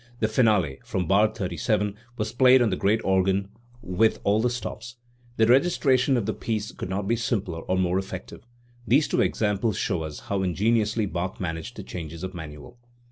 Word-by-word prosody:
The 110 - +2
finale, 105 - +2
from 90 -1 -2
bar 100 +5 +4
37, 105 0 -1 0.2
was 110 0 -2
played 130 0 +6
on 115 - +1
the - - +1
great 110 +3 +1
organ 95 +1 +1 0.3
with 105 +5 +1
all 105 +2 +2
the 125 - +2
stops, 120 0 -6 0.4
The 110 - +5
registration 135 0 +3
of 115 - -1
the 110 - -1
piece 110 -1 -3
could - - -7
not 95 +1 -2
be 115 - +2
simpler 100 -7 -2
or 95 - -1
more 90 0 +1
effective. 95 -1 -7 0.5
These 140 +6 +4
two - - +2
examples 105 0 0
show 85 - -1
us 80 -2 -6
how 100 -1 -2
in 90 -3 -1
geniously 110 0 +1
Bach 95 +1 -4
managed 80 -3 -4
the - - -7
changes 85 -1 -7
of 95 0 -5
manual. 80 +6 -10
105 Hz, 190 wpm, -25 LUFS, 95-115 Hz, 0.5 s, played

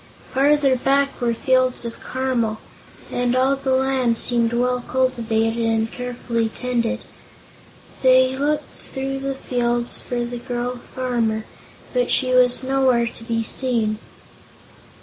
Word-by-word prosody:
Farther 275 0 +4
back 275 +2 +1
were 240 -1 +2
fields 255 0 +2
of 230 - -7
caramels, 250 -4 -1 0.5
and 245 0 0
all 260 +2 +3
the 265 -1 0
land 260 -3 +1
seemed 235 -1 +3
well 250 +1 +1
cultivated 230 -3 0
and 225 0 +1
carefully 240 -2 -2
tended. 240 -1 -2 1.0
They 260 0 +5
looked 295 +2 0
through 270 0 -5
the 275 0 -3
fields 240 -2 -1
for 240 -1 -2
the 240 0 -5
girl 245 0 -3
farmer, 235 -4 -2 0.5
but - - +1
she 255 -1 +2
was 250 0 +4
nowhere 260 -3 +2
to 230 0 -7
be 230 0 -1
seen. 225 -3 0
250 Hz, 130 wpm, -21 LUFS, 235-260 Hz, 1.0 s, They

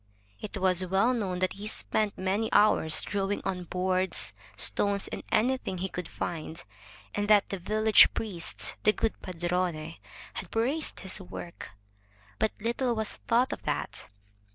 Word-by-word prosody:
It 210 0 -6
was 185 -1 +2
well 195 +7 +2
known 195 -7 -2
that 185 +1 0
he 205 +2 -7
spent 215 -1 -1
many 195 +4 0
hours 205 -7 +4
drawing 200 0 -1
on 180 -2 -2
boards, 185 +1 0 0.2
stones, 200 -1 +4
and - - -5
anything 250 -4 +1
he 190 +2 -2
could 180 -2 -5
find, 165 -1 -5 0.5
and 205 0 -1
that 210 -1 +5
the 195 - -3
village 215 +3 +6
priest, 190 -7 -4
the 210 - +4
good 225 - -2
padrone, 175 -2 -2 0.4
had - - -6
praised 265 +8 -1
his 190 0 -3
work. 175 -1 -8 0.7
But 220 - +2
little 235 +2 0
was 220 -1 0
thought 245 +2 +1
of - - -7
that. - - -3
195 Hz, 150 wpm, -29 LUFS, 180-215 Hz, 0.7 s, village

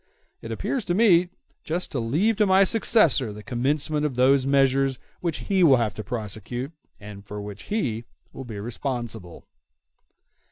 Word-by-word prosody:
It - - -7
appears 265 -5 -2
to 175 - 0
me 180 -5 +4 0.3
just 175 +3 -3
to 135 - -2
leave 160 - +1
to 210 -1 +3
my 190 +1 +5
successor 190 - +3
the 105 +1 -10
commencement 145 +5 -1
of 150 -4 -1
those 130 +1 +3
measures 135 -1 +2 0.2
which 170 -3 -3
he 195 -3 +2
will 140 -6 +6
have 110 -4 -1
to 110 - -7
prosecute, 120 +3 -5 0.3
and 105 -1 -10
for 105 +1 -8
which 100 0 -8
he 120 - -2 0.3
will 135 - -8
be 110 -5 -7
responsible." 115 -5 -5
130 Hz, 160 wpm, -24 LUFS, 110-170 Hz, 0.3 s, will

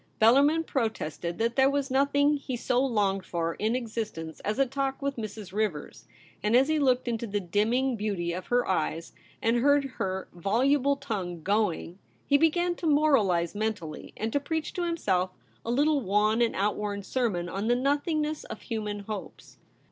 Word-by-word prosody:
Bellarmin 280 +8 +5
protested 175 - -2
that 230 +1 0
there 270 0 +5
was 280 -1 -1
nothing 285 +2 +3
he 270 -2 -5
so 245 +2 +1
longed 205 -7 +1
for 170 -2 -2
in 220 +6 -1
existence 220 -10 -4
as 210 +3 -2
a 275 - +4
talk 270 +1 -2
with 280 0 -2
Mrs. 215 -4 -7
Rivers; 180 - -3 0.3
and 210 +3 +2
as 265 +4 +5
he 315 -1 +2
looked 255 -3 +2
into 235 -1 -2
the 205 0 -1
dim 205 +4 0
ming 255 +1 +1
beauty 200 -5 -2
of 180 +1 -6
her 245 0 +1
eyes 165 -2 -1 0.3
and 230 +2 +3
heard 285 +3 +4 0.2
her 190 0 -2
voluble 260 - +2
tongue 180 - -4
going, 200 -3 0 0.3
he 285 - +3
began 345 +3 +2
to 335 - -3
moralize 225 - +3
mentally, 205 -7 -4
and 220 +1 -3
to 285 - +3
preach 315 +2 -3
to 355 - -2
himself 190 - 0 0.3
a - - -5
little 290 +4 +2
wan 210 +2 +2
and 235 - +2
outworn 205 0 -1
sermon 200 -7 -1
on 195 +5 -3
the 240 - +4
nothingness 300 +3 0
of - - -8
human 210 -3 -3
hopes. 205 -1 -8
225 Hz, 175 wpm, -28 LUFS, 195-275 Hz, 0.3 s, Bellarmin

